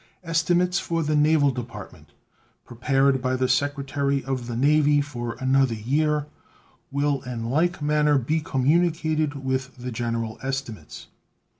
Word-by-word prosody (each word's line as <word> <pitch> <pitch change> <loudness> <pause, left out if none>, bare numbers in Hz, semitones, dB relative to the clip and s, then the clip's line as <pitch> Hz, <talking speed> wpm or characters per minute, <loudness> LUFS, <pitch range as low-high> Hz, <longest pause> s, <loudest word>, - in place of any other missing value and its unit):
Estimates 175 +2 +1
for 165 -1 -2
the 155 0 0
Naval 150 -1 +4
Department, 125 -2 -9 0.6
prepared 135 +2 +1
by 130 0 0
the 130 0 +1
Secretary 140 +1 0
of 130 -3 -3
the 120 - -4
Navy, 145 +3 +3
for 120 -5 -4
another 130 -2 +2
year 150 +6 0 0.6
will 140 -1 0
in 120 -2 -5
like 165 +2 +1
manner 150 0 +3
be 150 +6 0
communicated 155 +1 +1
with 130 0 -2
the 125 0 -6
general 115 -1 -3
estimates. 130 - -5
140 Hz, 130 wpm, -24 LUFS, 125-150 Hz, 0.6 s, Naval